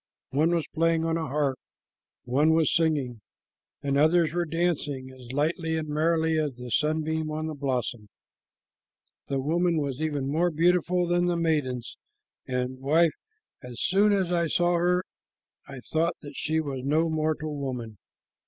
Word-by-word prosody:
One 155 Hz, +5 st, +2 dB
was 165 Hz, -, 0 dB
playing 165 Hz, 0 st, +2 dB
on 165 Hz, 0 st, 0 dB
a 160 Hz, -1 st, -2 dB
harp, 140 Hz, -1 st, 0 dB, 0.6 s
one 145 Hz, +7 st, +3 dB
was 160 Hz, -3 st, +3 dB
singing, 145 Hz, -9 st, 0 dB, 0.6 s
and 140 Hz, 0 st, +1 dB
others 160 Hz, +1 st, +4 dB
were 175 Hz, 0 st, 0 dB
dancing 150 Hz, -5 st, -1 dB
as 125 Hz, -2 st, -11 dB
lightly 160 Hz, +4 st, 0 dB
and 155 Hz, -1 st, -3 dB
merrily 160 Hz, +1 st, +1 dB
as 145 Hz, -5 st, -2 dB
a 125 Hz, -1 st, -7 dB
sunbeam 155 Hz, +2 st, 0 dB
on 155 Hz, +1 st, -3 dB
a -, -, -5 dB
blossom. 125 Hz, -6 st, -3 dB, 1.2 s
The 135 Hz, -1 st, -1 dB
woman 170 Hz, +4 st, +1 dB
was 140 Hz, -2 st, -2 dB
even 145 Hz, -4 st, -1 dB
more 165 Hz, +5 st, +2 dB
beautiful 175 Hz, +2 st, +2 dB
than 175 Hz, 0 st, +2 dB
the 175 Hz, -1 st, +1 dB
maidens, 150 Hz, -7 st, -1 dB, 0.5 s
and, 125 Hz, 0 st, -2 dB
wife, 155 Hz, +4 st, +3 dB, 0.5 s
as 125 Hz, -2 st, -9 dB
soon 205 Hz, +3 st, +3 dB
as 190 Hz, -3 st, +1 dB
I 170 Hz, -1 st, +2 dB
saw 175 Hz, +2 st, +2 dB
her 180 Hz, +1 st, +2 dB, 0.6 s
I 135 Hz, -2 st, -8 dB
thought 165 Hz, +5 st, 0 dB
that 145 Hz, 0 st, -9 dB
she 160 Hz, +1 st, 0 dB
was 140 Hz, -4 st, -3 dB
no 155 Hz, +4 st, +2 dB
mortal 155 Hz, -1 st, -1 dB
woman." 125 Hz, -7 st, -5 dB
155 Hz, 155 wpm, -27 LUFS, 135-165 Hz, 1.2 s, others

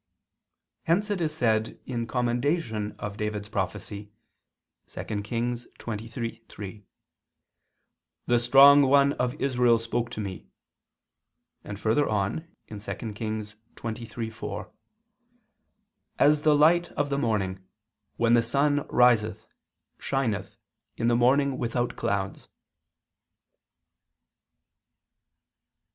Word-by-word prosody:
Hence 200 Hz, +6 st, +1 dB
it 195 Hz, -4 st, -1 dB
is 155 Hz, -2 st, 0 dB
said 110 Hz, -7 st, 0 dB
in 115 Hz, -3 st, -3 dB
commendation 120 Hz, -3 st, -1 dB
of 105 Hz, -1 st, -6 dB
David's 105 Hz, -1 st, -3 dB
prophecy 100 Hz, +1 st, -4 dB, 0.8 s
(2 105 Hz, -1 st, -5 dB
Kings 120 Hz, +3 st, -3 dB
23:3): 115 Hz, -2 st, -7 dB, 1.4 s
"The 120 Hz, 0 st, +3 dB
strong 140 Hz, +4 st, +8 dB
one 140 Hz, +1 st, +4 dB
of 125 Hz, -2 st, -1 dB
Israel 125 Hz, -3 st, +3 dB
spoke 115 Hz, +1 st, -2 dB
to 120 Hz, -, -6 dB
me," 95 Hz, -11 st, -6 dB, 1.2 s
and 105 Hz, -1 st, -7 dB
further 115 Hz, +8 st, +2 dB
on 105 Hz, -, -1 dB, 0.2 s
(2 105 Hz, -, -8 dB, 0.3 s
Kings 110 Hz, 0 st, -5 dB, 0.2 s
23:4): 115 Hz, -1 st, -6 dB, 1.5 s
"As 150 Hz, 0 st, +4 dB
the 150 Hz, -1 st, +4 dB
light 170 Hz, +4 st, +4 dB
of 145 Hz, 0 st, -1 dB
the 140 Hz, -, +1 dB
morning, 95 Hz, -7 st, -1 dB, 0.5 s
when 115 Hz, 0 st, +3 dB
the 120 Hz, -, +6 dB
sun 145 Hz, +5 st, +1 dB
riseth, 115 Hz, -4 st, +3 dB, 0.5 s
shineth 135 Hz, -6 st, -2 dB, 0.4 s
in 115 Hz, -, +1 dB
the 120 Hz, -, +3 dB
morning 130 Hz, +3 st, +3 dB
without 120 Hz, 0 st, -1 dB
clouds." 100 Hz, -4 st, -3 dB
120 Hz, 95 wpm, -27 LUFS, 110-140 Hz, 1.5 s, strong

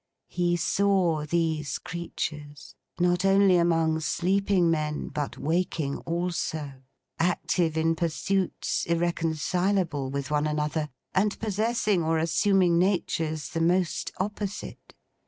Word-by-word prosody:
He 175 Hz, -1 st, +1 dB
saw 175 Hz, -4 st, +1 dB
these 160 Hz, -4 st, 0 dB
creatures, 150 Hz, -4 st, -6 dB, 0.3 s
not 175 Hz, 0 st, +2 dB
only 195 Hz, -1 st, +5 dB
among 165 Hz, -2 st, +2 dB
sleeping 185 Hz, +1 st, +1 dB
men 150 Hz, -2 st, -2 dB
but 145 Hz, -2 st, -4 dB
waking 160 Hz, -3 st, -1 dB
also, 160 Hz, -5 st, -3 dB, 0.4 s
active 170 Hz, -1 st, +1 dB
in 165 Hz, +1 st, +2 dB
pursuits 175 Hz, +3 st, -1 dB
irreconcilable 170 Hz, -1 st, 0 dB
with 140 Hz, 0 st, -4 dB
one 150 Hz, 0 st, +1 dB
another, 150 Hz, 0 st, -1 dB, 0.2 s
and 205 Hz, +2 st, +1 dB
possessing 215 Hz, -2 st, 0 dB
or 160 Hz, 0 st, +1 dB
assuming 175 Hz, +1 st, +3 dB
natures 160 Hz, -6 st, 0 dB
the 165 Hz, -, -2 dB
most 175 Hz, +1 st, +1 dB
opposite. 205 Hz, +1 st, -5 dB
170 Hz, 105 wpm, -27 LUFS, 155-185 Hz, 0.4 s, only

